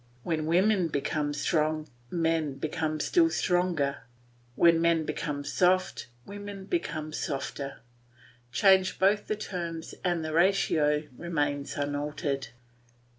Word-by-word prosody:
When 155 -2 -1
women 185 +2 +3
become 150 0 -1
strong, 155 +1 0 0.2
men 165 -3 0
become 155 +2 -2
still 330 - +3
stronger; 175 - +1 0.6
when 170 +1 +5
men 165 -1 +3
become 145 -1 -3
soft, 185 +3 +1 0.2
women 200 -1 -8
become 155 - -3
softer; 140 -2 -4 0.7
change 190 - +4
both 205 +2 +2
the 215 - 0
terms 170 -5 -5
and 175 -3 0
the 155 - -3
ratio 160 -4 +3
remains 145 -4 -2
unaltered. 145 -1 -2
160 Hz, 110 wpm, -28 LUFS, 150-185 Hz, 0.7 s, when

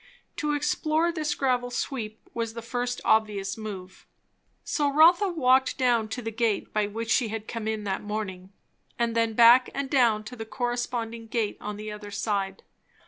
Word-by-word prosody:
To 300 0 0
explore 310 +3 +1
this 310 -3 -2
gravel 250 -2 0
sweep 230 -3 -4
was 230 -1 -3
the 230 - -6
first 245 +1 -3
obvious 210 -3 +2
move. 190 -4 -8 0.6
So 290 -3 0
Rotha 340 +7 +6
walked 265 -6 +3
down 235 -4 +2
to 245 +2 -5
the 225 - -3
gate 225 -2 -1
by 210 -1 +1
which 225 +2 -4
she 240 - +3
had 220 0 -5
come 225 -2 -4
in 220 -1 -2
that 195 -2 -2
morning, 200 -3 -5 0.5
and 235 -1 0
then 230 -1 +1
back 240 +3 +7
and 275 -1 -3
down 235 -6 +3
to 245 +4 -9
the 225 - -6
corresponding 240 -1 -3
gate 220 -2 -1
on 210 0 -5
the 215 0 -6
other 210 0 -8
side. 200 -2 -2
230 Hz, 175 wpm, -27 LUFS, 215-250 Hz, 0.6 s, back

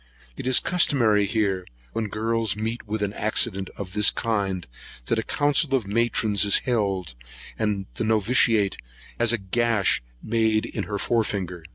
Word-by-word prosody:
It - - -6
is 130 - +5
customary 120 - +2
here, 100 -4 0 0.3
when 110 -1 -2
girls 110 0 -1
meet 110 +2 -4
with 105 0 -2
an 100 0 -2
accident 100 -3 0
of 95 -2 -7
this 105 0 +5
kind, 100 -6 -2 0.4
that 115 - 0
a - - +1
council 145 +2 +1
of 125 -6 -1
matrons 110 -1 +1
is 100 - +6
held, 100 - -1 0.5
and 105 -3 -1
the - - -3
noviciate 110 -1 +2 0.4
has 120 -1 +3
a 120 - +1
gash 110 +1 +1 0.2
made 110 -1 +1
in - - -4
her 105 - -3
fore 115 +2 +1
finger. 90 -5 -4
110 Hz, 160 wpm, -24 LUFS, 100-115 Hz, 0.5 s, is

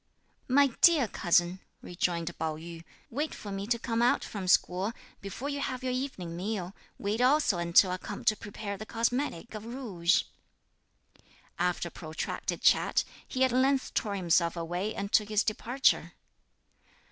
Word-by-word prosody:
"My 275 +1 +4
dear 315 -8 +6
cousin," 175 -1 +2 0.2
rejoined 175 -1 -2
Pao 160 -1 -1
yü, 165 +1 -9 0.3
"wait 295 +6 -2
for 205 - -8
me 195 +1 -4
to 235 +1 +2
come 230 0 -1
out 240 - +3
from 195 -3 -5
school, 185 +4 +2 0.3
before 200 +7 -5
you 285 0 -2
have 260 -2 -3
your 255 -1 -1
evening 250 -11 -4
meal; 190 0 -3 0.2
wait 210 +4 -1
also 255 - +3
until 170 +2 +5
I 185 - -1
come 200 +2 -7
to 215 - +4
prepare 205 -1 -6
the 215 - -7
cosmetic 235 - -1
of 215 -1 -6
rouge." 220 -8 0 1.4
After 175 0 0
a - - -25
protracted 160 -2 -4
chat, - - +4 0.2
he 260 - 0
at 260 - +3
length 265 +2 +2
tore 205 -2 -1
himself 170 -2 +2
away 175 +6 -3
and 200 +1 -4
took 210 -1 +3
his 215 0 +2
departure. 245 +5 +1
205 Hz, 160 wpm, -29 LUFS, 175-250 Hz, 1.4 s, dear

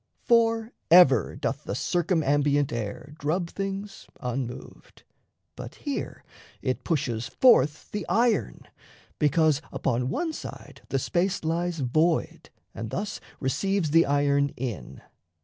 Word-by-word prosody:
For 230 0 +2 0.2
ever 140 - +6
doth - - -3
the - - -3
circumambient 145 -5 +1
air 115 +5 -5
Drub 170 +4 -1
things 195 +1 -5
unmoved, 125 -1 -6 0.5
but - - -8
here - - -5 0.4
it 130 -1 -1
pushes 125 -8 -1
forth 150 - +3
The 210 - -4
iron, 235 0 +1 0.6
because 155 -1 +3
upon 125 0 -1
one 325 - -2
side - - -9
the 135 - 0
space 180 +8 0
Lies 170 0 -1
void 155 +6 0 0.2
and 115 -1 -6
thus 205 - -4 0.2
receives 185 +4 0
the 165 +2 +5
iron 140 0 +2
in. 120 -5 -6
155 Hz, 115 wpm, -26 LUFS, 135-190 Hz, 0.6 s, ever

